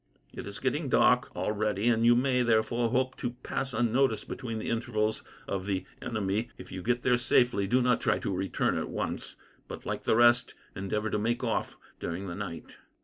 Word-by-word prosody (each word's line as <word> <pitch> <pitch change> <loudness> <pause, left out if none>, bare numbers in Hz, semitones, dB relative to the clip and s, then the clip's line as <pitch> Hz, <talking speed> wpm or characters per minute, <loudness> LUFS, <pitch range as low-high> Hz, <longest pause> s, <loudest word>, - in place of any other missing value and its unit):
It - - -7
is - - -6
getting - - -1
dark - - +4
already, 105 0 0
and 115 -1 +3
you 120 +1 +6
may, 125 0 +2
therefore, 115 0 +2
hope 130 +2 0
to 120 - -3
pass 135 0 -2
unnoticed 120 -1 +1
between 115 -3 -5
the 110 - -3
intervals 110 -2 -1 0.3
of 95 0 -3
the 95 -2 -1 0.2
enemy. 110 +1 -1
If 90 - -11
you 95 - -5
get 120 +4 0
there 125 -1 +3
safely, 120 -4 +3
do 125 +5 +3
not 125 -1 +2
try - - +2
to 95 - -2
return 95 +1 0
at - - -4
once, - - -4 0.3
but, - - -8
like - - -4
the - - +3
rest, 120 +1 +4 0.2
endeavour 105 +2 -2
to 105 - 0
make 120 +4 -1
off 115 - -1 0.2
during 85 +4 -4
the 90 - -5
night." 95 -3 -7
115 Hz, 195 wpm, -29 LUFS, 100-120 Hz, 0.3 s, you